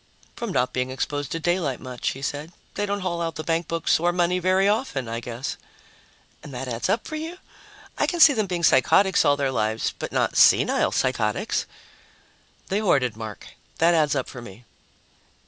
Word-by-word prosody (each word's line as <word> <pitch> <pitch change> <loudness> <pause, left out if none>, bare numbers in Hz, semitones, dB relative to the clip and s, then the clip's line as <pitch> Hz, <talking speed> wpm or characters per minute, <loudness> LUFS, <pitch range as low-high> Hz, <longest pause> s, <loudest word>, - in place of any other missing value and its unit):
"From 235 -4 -4
not 125 -7 0
being 130 0 -1
exposed 145 +1 -3
to 165 - -2
daylight 165 -6 -1
much," 125 -1 -4
he 135 - -10
said. 145 +4 -4 0.2
"They 205 - -2
don't 200 0 -2
haul 170 -2 -2
out 165 -1 -3
the 155 - -5
bankbooks 165 0 0
or 175 +2 +2
money 175 +1 +1
very 185 +2 +2
often, 205 - -1
I 115 +1 -3
guess." 120 +2 -5 0.8
"And 150 - -11
that 130 +1 -5
adds 120 -1 -3
up 230 - 0
for 310 - -4
you? 325 +3 -6 0.6
I - - +2
can 350 - -2
see 310 -2 +8
them 215 -5 -1
being 175 -2 -3
psychotics 190 +7 +4
all 145 0 +3
their 140 -2 0
lives... 110 -2 -1
but - - -5
not - - 0
senile - - +5
psychotics." 115 -5 -1 1.0
"They 195 - +1
hoarded, 135 - +1
Mark. 110 -2 -8 0.3
That 170 +1 +4
adds 150 -3 +2
up 130 - -1
for 125 - -9
me." 115 +1 -12
155 Hz, 185 wpm, -24 LUFS, 125-185 Hz, 1.0 s, see